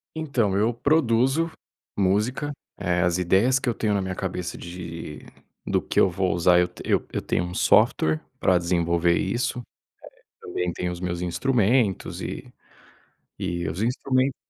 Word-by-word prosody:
Então, 130 -11 0
eu 110 +4 +2
produzo 140 +3 +2 0.5
música. 105 +9 +1 0.3
Eh, 90 0 0
as 90 0 +2
ideias 95 +9 +3
que 135 - -1
eu 120 - +1
tenho 105 -2 0
na 100 - +1
minha 95 -1 -3
cabeça 90 -2 -4
de 85 -3 -7 0.5
do - - +1
que - - -1
eu 95 - +5
vou 90 +1 0
usar, 90 +1 +4
eu 90 - +3
t - - -13
eu - - +1
eu - - -1
tenho - - 0
um 90 - -5
software 80 -3 +3 0.2
pra 95 - +4
desenvolver 85 0 +1
isso. 120 +5 -1 0.8
Eh, - - -11
também, 90 -1 -2
tenho 90 +1 -3
os 85 - -7
meus 90 -1 -3
instrumentos 110 +2 +1
e, - - -6 0.9
e 85 -3 -3
os 90 +7 -3
instrumentos 130 +2 +1
95 Hz, 160 wpm, -25 LUFS, 90-120 Hz, 0.9 s, eu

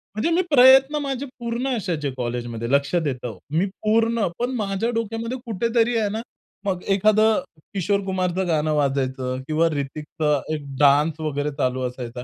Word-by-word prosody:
म्हणजे 215 +10 0
मी 365 - +4
प्रयत्न 265 +2 +7
माझे 275 -1 -3
पूर्ण 235 +2 -2
असायचे 165 -9 -2
कॉलेजमध्ये. 120 -1 -3
लक्ष 140 +2 +2
देतो 130 - -2
मी 160 +6 +1 0.2
पूर्ण, 225 0 +2
पण 245 - 0
माझ्या 205 +1 -1
डोक्यामध्ये 230 +2 -3
कुठेतरी 230 +2 +1
आहे 215 -2 +1
ना, 220 +2 -3 0.4
मग 185 -2 -2
एखादं 215 +2 +3 0.3
किशोर 200 +1 +1
कुमारचं 185 -1 -1
गाणं 155 -2 +1
वाजायचं 130 -3 -1
किंवा 160 +1 +2
रितिकचं 150 0 -2
एक 150 -2 -4
डान्स 150 +3 +4
वगैरे 150 -1 -2
चालू 130 -2 0
असायचा. 125 -1 -7
175 Hz, 145 wpm, -23 LUFS, 140-225 Hz, 0.4 s, प्रयत्न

